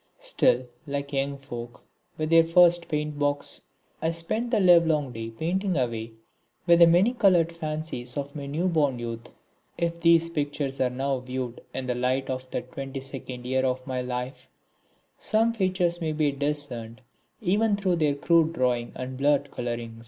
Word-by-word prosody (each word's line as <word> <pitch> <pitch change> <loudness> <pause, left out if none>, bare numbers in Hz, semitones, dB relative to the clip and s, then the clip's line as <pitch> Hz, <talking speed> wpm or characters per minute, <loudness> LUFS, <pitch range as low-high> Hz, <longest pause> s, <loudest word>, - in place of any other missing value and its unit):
Still, 125 +1 +2 0.2
like 140 0 -4
young 140 +1 -1
folk 120 -3 -9 0.3
with 155 +1 -2
their 165 0 +7
first 175 +1 +4
paint 150 -1 -2
box, 145 0 0 0.4
I 160 - +1
spent 165 +9 -2
the 230 -3 +2
livelong 165 -7 +4
day 115 -1 -6
painting 175 - -1
away 115 -3 -2 0.5
with 170 -1 +5
the 170 - +9
many 180 +8 +4
coloured 185 -8 +4
fancies 155 -6 -5
of 140 +1 -4
my 140 -2 -5
new 160 +6 -1
born 150 -7 +1
youth. 115 -1 -6 0.5
If 170 0 -1
these 165 0 +4
pictures 145 -3 -2
are 130 - +3
now 135 +1 -1
viewed 125 -1 -5
in 130 - -4
the 125 - 0
light 130 +2 0
of 130 0 -5
that - - -5
twenty 135 0 -6
second 130 -2 -8
year 130 +1 +1
of 130 0 -1
my 130 -1 -2
life, 125 +1 -5 0.7
some 225 +1 +2
features 185 -4 0
may 160 -1 -1
be 150 -1 +1
discerned 140 -5 -4 0.4
even 210 +2 +2
through 185 -3 +1
their 150 -3 +2
crude 165 +2 +3
drawing 125 -5 0
and 130 0 -5
blurred 140 0 +2
colouring. 120 -1 -5
145 Hz, 165 wpm, -26 LUFS, 130-170 Hz, 0.7 s, the